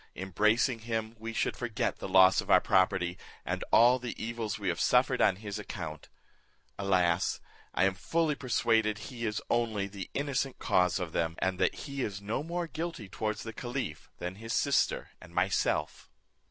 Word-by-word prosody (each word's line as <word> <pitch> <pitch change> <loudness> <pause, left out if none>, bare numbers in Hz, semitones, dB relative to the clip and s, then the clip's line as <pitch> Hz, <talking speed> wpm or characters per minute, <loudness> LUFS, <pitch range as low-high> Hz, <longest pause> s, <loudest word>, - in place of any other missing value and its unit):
Embracing 105 +6 +2
him 110 0 -3
we 115 +1 -5
should - - -1
forget 120 0 -2
the - - -5
loss 95 0 +6
of - - -12
our - - +7
property, 95 -1 +2 0.3
and - - -2
all 120 +2 +6
the 120 -1 -5
evils 115 -1 -3
we 100 -2 -4
have 85 -2 0
suffered - - +3
on - - +4
his 100 +1 -6
account. 80 -7 -7 0.7
Alas! 90 -3 +2 0.4
I 90 - +3
am 95 0 +3
fully 160 - 0
persuaded 115 -5 +1
he 115 0 -5
is 105 +1 -3
only 115 -4 0
the 100 -1 -7
innocent 135 -2 -1
cause 90 -2 +2
of 90 -4 -4
them; 80 0 -1
and 95 -1 -1
that - - +2
he 140 -2 -4
is 100 -5 -3
no 105 +6 -2
more 170 +3 -3
guilty 160 - -5
towards 110 +3 -3
the 115 - -6
caliph 120 - -5
than 90 +2 -5
his 115 +1 -5
sister 140 -2 +1
and - - -14
myself." - - 0
110 Hz, 175 wpm, -30 LUFS, 95-120 Hz, 0.7 s, our